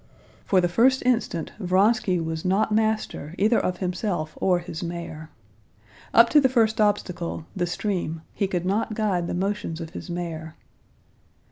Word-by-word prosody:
For 190 - +3
the 175 - +2
first 250 +9 +3
instant 235 -9 0
Vronsky 190 0 +2
was 160 -1 -3
not 195 +4 +1
master 215 -7 -1
either 220 +4 +3
of 180 -1 -1
himself 180 -4 -2
or 180 -2 +3
his 175 -2 -6
mare. 170 -2 -6 0.8
Up 230 +1 +7
to 300 - +6
the 260 - +4
first 225 -3 +2
obstacle, 180 -6 -1
the 175 -2 0
stream, 175 -4 -3
he 200 - 0
could 180 -2 -2
not 210 +3 0
guide 195 -6 0
the - - -3
motions 195 -3 -2
of 165 -1 -7
his 185 - -8
mare. 165 -2 -5
185 Hz, 155 wpm, -25 LUFS, 170-215 Hz, 0.8 s, Up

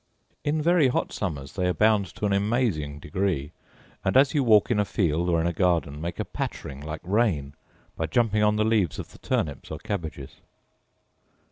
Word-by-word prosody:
In 150 +1 0
very 170 -3 +4
hot 125 - -1
summers 75 -8 -4
they 90 -1 0
abound 105 +2 +3
to - - -3
an 100 - +1
amazing 100 - 0
degree, 85 -2 -2 0.5
and - - +2
as 135 0 +5
you 145 -3 +2
walk 110 -2 +5
in 110 - +2
a - - +4
field 85 -4 0
or 85 -1 +2
in 80 - 0
a 85 - 0
garden, 85 -5 0
make 85 +1 -4
a - - -1
pattering 70 +1 -5
like 80 +1 -6
rain, 90 -8 +1 0.4
by - - -2
jumping 110 -3 +2
on 105 0 +3
the 105 0 +2
leaves 105 -8 +1
of - - -7
the - - -16
turnips 70 -4 -2
or - - -5
cabbages. 80 -9 -5
95 Hz, 190 wpm, -26 LUFS, 80-110 Hz, 0.5 s, as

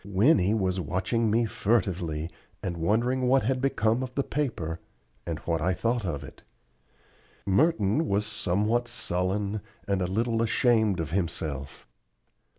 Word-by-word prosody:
Winnie 100 - +3
was 95 -3 0
watching 95 +6 0
me 115 +2 +3
furtively, 90 -8 -1 0.3
and 90 -3 -2
wondering 120 +9 +1
what 135 +1 +4
had 130 +3 0
become 115 -3 +1
of 130 -1 -5
the 140 - +1
paper, 85 - -2 0.5
and 85 -2 -2
what 80 -2 -1
I 90 +3 +1
thought 115 -2 0
of 75 -4 -3
it. - - -12 1.0
Merton 140 - +2
was 100 +1 +1
somewhat 105 +4 0
sullen, 100 -1 -1 0.3
and 100 -2 +1
a 90 - 0
little 115 +4 0
ashamed 115 -4 +2
of 80 -1 -3
himself. 80 -8 -3
105 Hz, 140 wpm, -27 LUFS, 90-120 Hz, 1.0 s, what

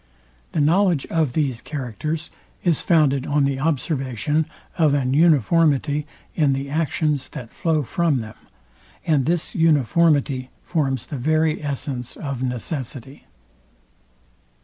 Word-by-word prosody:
The - - 0
knowledge 170 0 +3
of 155 -6 +1
these 135 -6 -1
characters 150 +4 -4 0.3
is 170 -5 +2
founded 145 -6 +2
on 145 0 +2
the 140 -1 0
observation 145 0 -1 0.3
of 150 -3 +4
an 130 -2 0
uniformity 150 -1 +3 0.3
in 145 -4 +2
the 135 +1 -4
actions, 150 -2 0
that 115 -2 -8
flow 160 -3 0
from 165 +2 +1
them; 110 -1 -7 0.7
and 150 -5 +2
this 170 0 -1
uniformity 145 -3 +2
forms 135 -7 -1
the 145 - -6
very 155 +3 +1
essence 135 -3 -4
of 140 -4 -4
necessity. 130 +1 -5
145 Hz, 120 wpm, -22 LUFS, 135-160 Hz, 0.7 s, of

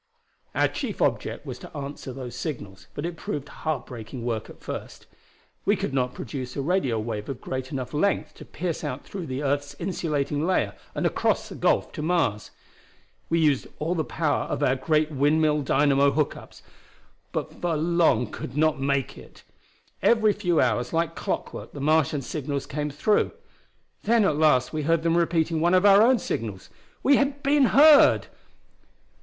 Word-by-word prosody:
"Our - - +3
chief - - -5
object - - -1
was - - -6
to - - -10
answer 140 -1 -6
those 125 -2 -7
signals, 105 - -6
but 145 - -3
it 175 0 -4
proved 145 -2 -5
heartbreaking 125 -6 -5
work 115 -3 -3
at - - -13
first. - - -7 0.6
We - - +3
could 135 - -3
not 125 -2 0
produce 130 -3 -6
a 140 - -2
radio 140 -9 +1
wave 110 -1 -4
of 135 - -5
great 130 0 -5
enough 130 -2 -4
length 195 +6 0
to - - -11
pierce 170 -2 -4
out 130 +2 -4
through 185 -5 -6 0.2
earth's 145 0 -1
insulating 150 -5 -2
layer 160 - +1 0.2
and - - -1
across - - 0
the - - -7
gulf - - +1
to - - -6
Mars. 155 -11 0 0.8
We 165 - +2
used 145 -4 +2
all 160 +3 -1
the 165 -3 0
power 155 0 -1
of - - -2
our 130 - +3
great 155 +3 +1
windmill 150 +2 +2
dynamo 140 0 +3
hook 150 +1 0
ups, - - -13 0.7
but - - -5
for 170 -3 0
long 165 -7 +2
could 125 +5 -7
not 155 -2 +2
make 140 -1 -1
it. - - -16 0.6
Every 220 -2 +4
few 175 -5 0
hours 120 +4 +1
like 165 0 0
clockwork - - -4
the 145 - -7
Martian 150 -1 +2
signals 140 -1 -3
came 150 +1 -3
through. 175 +9 +1 0.7
Then 225 0 +3
at 155 - +2
last 150 -4 +3
we 155 - -1
heard 165 +2 +1
them 165 0 +2
repeating 165 -1 +1
one 175 +2 +4
of 185 +2 +4
our 200 0 +8
own 250 +3 +5
signals. 105 - -5 0.3
We 275 0 +5
had 280 0 0
been 280 0 +4
heard! 290 +3 +7
150 Hz, 170 wpm, -25 LUFS, 135-170 Hz, 0.8 s, our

